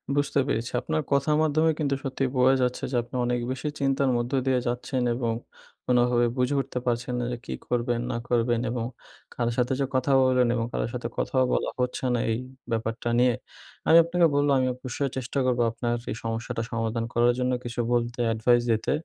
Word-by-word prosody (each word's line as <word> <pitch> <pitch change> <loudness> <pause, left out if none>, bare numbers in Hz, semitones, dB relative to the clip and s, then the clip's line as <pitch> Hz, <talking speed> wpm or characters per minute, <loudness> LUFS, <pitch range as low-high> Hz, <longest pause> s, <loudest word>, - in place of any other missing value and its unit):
বুঝতে 145 0 +1
পেরেছি। 120 -2 -1
আপনার 155 0 -1
কথার 140 +2 +3
মাধ্যমে 155 +1 +3
কিন্তু 140 -3 +1
সত্যি 135 -1 -2
বোঝা 130 +1 +5
যাচ্ছে 125 0 -1
যে - - -1
আপনি 120 - -11
অনেক 120 0 0
বেশি 130 +3 -4
চিন্তার 135 0 +2
মধ্য 120 +1 -2
দিয়ে 130 -1 +2
যাচ্ছেন 125 +2 -2
এবং 120 -2 -1 0.5
কোনভাবে 120 -1 +3
বুঝে 125 +3 +1
উঠতে 130 -1 -5
পারছেন 120 0 -1
না 120 - -1
যে 120 - -3
কি - - -4
করবেন, 120 -1 0
না - - -2
করবেন 120 -1 +2
এবং 120 -1 -2 0.5
কারো 120 -1 0
সাথে 125 +1 +1
যে 140 - +2
কথা 130 +2 +1
বললেন 125 -1 +3
এবং 115 - 0
কারো - - 0
সাথে 125 -1 -3
কথাও 130 -1 +1
বলা - - 0
হচ্ছে 125 +1 -1
না 120 - +1
এই 110 - 0 0.3
ব্যাপারটা 115 +1 -2
নিয়ে। 125 0 +4 0.5
আমি 165 - +8
আপনাকে 170 +1 +2
বললাম, 145 0 +3
আমি 130 - +1
অবশ্যই 130 +2 -3
চেষ্টা 130 +2 -2
করব 125 -1 +1
আপনার 120 +1 -2 0.2
এই - - -3
সমস্যাটা 115 0 -3
সমাধান 115 0 -1
করার 120 +1 +4
জন্য 125 0 +1
কিছু 120 0 -5
বলতে, 120 0 -1
এডভাইস 120 +2 +3
দিতে। 110 -1 0
125 Hz, 190 wpm, -26 LUFS, 120-135 Hz, 0.5 s, আমি